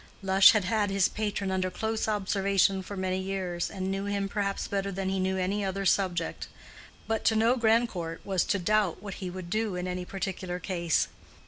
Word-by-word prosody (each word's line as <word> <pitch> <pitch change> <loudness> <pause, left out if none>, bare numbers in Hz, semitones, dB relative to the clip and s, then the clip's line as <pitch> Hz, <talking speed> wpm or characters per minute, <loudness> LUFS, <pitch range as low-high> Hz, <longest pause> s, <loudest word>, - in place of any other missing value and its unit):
Lush 195 0 +7
had 210 -4 +1
had 205 +1 +1
his 195 -1 +3
patron 205 -2 -2
under 185 0 0
close 220 +4 -2
observation 195 -2 +2
for 200 +2 -7
many 185 0 -1
years, 190 -2 -2
and 190 -1 -3
knew 195 +1 -2
him 200 -1 -1
perhaps 200 -1 -2
better 200 0 -2
than 190 0 -2
he 190 0 -1
knew 190 0 0
any 195 +3 0
other 195 0 -2
subject; 180 -4 0 0.6
but 225 0 -1
to 220 - +4
know 225 +3 +4
Grandcourt 220 -8 0
was 190 -3 +1
to 200 - +1
doubt 205 0 +1
what 200 -2 -5
he 185 - -3
would 180 -1 -7
do 215 -2 0
in 180 0 -3
any 180 0 -3
particular 185 -1 -4
case. 175 -3 0
195 Hz, 195 wpm, -28 LUFS, 185-205 Hz, 0.6 s, Lush